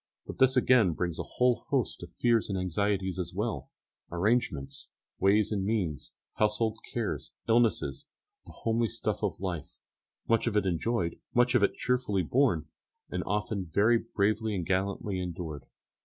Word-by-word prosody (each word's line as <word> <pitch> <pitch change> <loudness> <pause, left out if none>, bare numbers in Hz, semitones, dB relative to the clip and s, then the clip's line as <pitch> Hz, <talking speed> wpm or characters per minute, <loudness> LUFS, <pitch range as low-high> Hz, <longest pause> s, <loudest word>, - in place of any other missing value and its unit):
But - - -8
this 130 0 +5
again 120 -8 +5
brings 85 0 -2
a - - -1
whole 125 -2 +3
host - - 0
of - - -9
fears 115 -3 +3
and 100 - -1
anxieties 95 +1 0
as 90 -1 -4
well 95 - -2 0.4
arrangements, 85 - 0 0.3
ways 100 +2 +4
and 100 -3 0
means, 95 -8 -1 0.2
household 110 +1 +1
cares, 90 - -3
illnesses, 115 - +2 0.4
the - - -10
homely 115 0 0
stuff - - -2
of - - -1
life, 85 -6 -4 0.5
much 115 +1 +2
of 110 -3 +1
it 105 - +2
enjoyed, 90 0 -1 0.2
much 125 0 +4
of 125 - +4
it 100 - +2
cheerfully 125 -7 0
borne, 105 - +2 0.5
and - - -1
often 105 -2 -2
very 110 +7 +4
bravely 110 +1 0
and 90 -3 -2
gallantly 95 +1 -1
endured. 80 -5 -5
100 Hz, 155 wpm, -29 LUFS, 90-115 Hz, 0.5 s, this